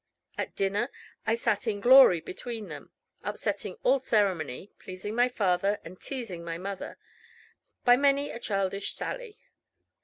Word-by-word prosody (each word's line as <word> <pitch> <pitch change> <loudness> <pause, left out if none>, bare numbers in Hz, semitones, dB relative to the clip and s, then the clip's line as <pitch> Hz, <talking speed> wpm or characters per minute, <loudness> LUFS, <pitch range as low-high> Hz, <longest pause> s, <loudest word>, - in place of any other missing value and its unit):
At - - -4
dinner 200 +5 0 0.4
I 220 - +3
sat 230 -1 0
in 205 -2 0
glory 245 -7 +8
between 225 +3 -6
them, - - -9 0.3
upsetting - - -3
all 275 - +4
ceremony, 195 - 0
pleasing 185 +3 -6
my 245 +2 +3
father, 200 -2 +1
and 180 +2 -11
teasing 230 -11 -5
my 165 -1 -4
mother, 195 +2 -6 0.9
by 245 0 +7
many 280 +1 +2
a - - -6
childish 195 -2 -1
sally. 485 -4 -5
210 Hz, 140 wpm, -28 LUFS, 185-245 Hz, 0.9 s, glory